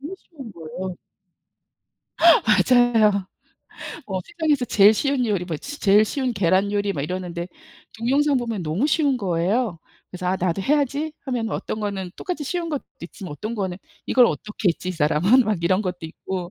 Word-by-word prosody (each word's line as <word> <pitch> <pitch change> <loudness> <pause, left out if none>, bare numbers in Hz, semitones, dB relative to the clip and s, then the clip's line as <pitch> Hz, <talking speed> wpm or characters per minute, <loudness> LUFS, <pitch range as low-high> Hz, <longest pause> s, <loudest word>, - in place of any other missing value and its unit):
너무 305 +7 -6
쉬운 275 - -12
거에요. 170 +3 -6 1.2
맞아요. 225 - +4 0.8
어 190 -2 -3
세상에서 300 -6 0
제일 205 -1 +6
쉬운 275 +1 0
요리, 200 -5 0
뭐 170 -3 -4
치 290 - -8
제일 205 +1 +5
쉬운 255 +3 -2
계란 195 0 +1
요리 205 -1 0
막 145 - -3
이러는데 175 +1 -4 0.5
동영상 275 +4 +2
보면 230 -6 -2
너무 165 - 0
쉬운 290 -3 +2
거예요. 190 +1 0 0.3
그래서 180 0 -6
'아 185 +1 +1
나도 185 +1 -1
해야지.' 295 +3 0
하면 240 -4 -2
어떤 215 - -4
거는 195 -3 -3
똑같이 355 -5 -4
쉬운 340 +4 -3
것도 295 -4 -3 0.2
있지만 195 -10 -8
어떤 215 +9 -5
거는 190 -4 -3 0.3
'이걸 250 -2 +5
어떻게 210 -3 -2
했지 175 +1 -2
이 - - -1
사람은?' 165 - +3
막 205 -5 -1
이런 185 +4 +2
것도 180 -3 -3
있고. 175 +2 -6
210 Hz, 345 characters per minute, -23 LUFS, 180-260 Hz, 1.2 s, 제일